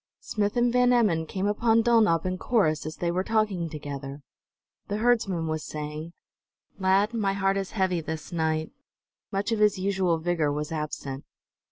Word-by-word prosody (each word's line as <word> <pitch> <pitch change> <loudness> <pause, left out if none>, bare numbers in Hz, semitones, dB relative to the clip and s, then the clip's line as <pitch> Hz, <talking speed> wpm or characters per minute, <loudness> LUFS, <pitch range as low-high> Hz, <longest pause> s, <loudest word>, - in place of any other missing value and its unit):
Smith 205 +2 -1
and 240 0 +3
Van 250 0 +4
Emmon 195 -10 +2
came 190 +3 -3
upon 225 +2 +3
Dulnop 220 -9 +3
and 185 0 -2
Corrus 155 -11 +1
as 155 - -5
they 170 -1 -1
were 185 +2 0
talking 210 -6 0
together. 140 -2 -7 0.6
The 205 - -2
herdsman 215 -7 +1
was 155 -1 -2
saying: 150 +2 -6 0.7
"Lad, 195 +4 +3
my 205 -4 0
heart 195 0 +1
is 195 -1 -2
heavy 185 -4 +1
this 160 +1 -6
night." 160 -2 -1 0.6
Much 200 +2 -1
of 225 - 0
his 210 -2 +4
usual 185 -3 +1
vigor 160 -2 0
was 150 +1 -3
absent. 150 -3 -4
185 Hz, 165 wpm, -27 LUFS, 155-210 Hz, 0.7 s, Van